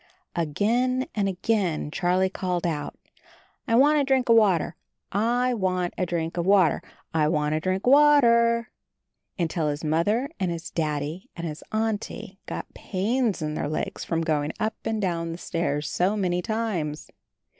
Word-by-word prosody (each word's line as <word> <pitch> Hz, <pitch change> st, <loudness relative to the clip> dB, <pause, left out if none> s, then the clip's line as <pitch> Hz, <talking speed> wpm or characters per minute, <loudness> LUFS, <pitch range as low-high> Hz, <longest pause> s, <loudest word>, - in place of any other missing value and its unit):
Again 230 Hz, -, +1 dB
and 200 Hz, -2 st, 0 dB
again 185 Hz, -5 st, -1 dB
Charlie 180 Hz, +2 st, +2 dB
called 180 Hz, -2 st, -2 dB
out, 150 Hz, -4 st, -3 dB, 0.7 s
"I 230 Hz, -, +2 dB
want 295 Hz, +4 st, +5 dB
a -, -, +3 dB
drink 265 Hz, -2 st, +1 dB
of 230 Hz, -, +7 dB
water, 190 Hz, -7 st, +3 dB, 0.4 s
I 240 Hz, +5 st, +1 dB
want 185 Hz, -5 st, -1 dB
a 180 Hz, -, -1 dB
drink 165 Hz, 0 st, -2 dB
of 170 Hz, -, 0 dB
water, 190 Hz, -7 st, +4 dB, 0.3 s
I 155 Hz, -2 st, +3 dB
want 150 Hz, -1 st, +1 dB
a 155 Hz, -, +1 dB
drink 185 Hz, +3 st, -1 dB
of 250 Hz, -, +6 dB
water," 235 Hz, -6 st, +5 dB, 0.7 s
until 165 Hz, -3 st, 0 dB
his 145 Hz, +2 st, -4 dB
Mother 205 Hz, -, +1 dB
and 185 Hz, -2 st, 0 dB
his 170 Hz, 0 st, -5 dB
Daddy 155 Hz, +2 st, -3 dB
and 170 Hz, -, -5 dB
his 155 Hz, -2 st, -6 dB
Auntie 215 Hz, -3 st, -3 dB
got -, -, -6 dB
pains 215 Hz, 0 st, -1 dB
in 150 Hz, 0 st, -2 dB
their 145 Hz, -, -2 dB
legs 155 Hz, -, -3 dB
from 165 Hz, -1 st, -1 dB
going 155 Hz, -2 st, 0 dB
up 215 Hz, +1 st, 0 dB
and 220 Hz, -1 st, -1 dB
down 170 Hz, -4 st, -1 dB
the -, -, -7 dB
stairs 155 Hz, -4 st, -2 dB
so 190 Hz, +4 st, +1 dB
many 180 Hz, -3 st, 0 dB
times. 195 Hz, -9 st, -3 dB
185 Hz, 165 wpm, -25 LUFS, 165-225 Hz, 0.7 s, of